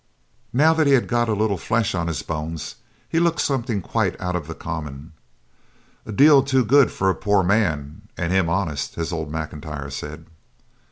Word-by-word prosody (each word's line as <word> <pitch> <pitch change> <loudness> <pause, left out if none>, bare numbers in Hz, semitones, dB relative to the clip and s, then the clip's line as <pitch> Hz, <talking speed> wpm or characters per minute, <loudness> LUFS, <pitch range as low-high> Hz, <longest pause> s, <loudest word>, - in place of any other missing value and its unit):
Now 155 +6 +4
that 160 -2 +2
he 140 - +5
had 130 - +3
got 120 -1 +1
a 110 - +1
little 105 -3 0
flesh 110 +4 0
on 85 -3 -1
his 80 -5 -3
bones 80 -1 -5 0.3
he 165 - 0
looked 170 -1 +1
something 120 -7 -1
quite - - -1
out 90 0 -2
of 80 -4 -4
the 80 - -6
common. 75 -2 -6 1.0
'A 110 - -5
deal 140 +4 +7
too 130 -2 +1
good 140 +3 +5
for 95 0 +1
a - - -3
poor 100 -2 +2
man, 85 -8 0
and 90 +1 -1
him 95 -3 +2
honest,' 85 -5 -2
as 85 +1 -3
old 80 -2 -4
M'Intyre 75 -2 -6
said. 75 +3 -7
90 Hz, 185 wpm, -22 LUFS, 80-120 Hz, 1.0 s, deal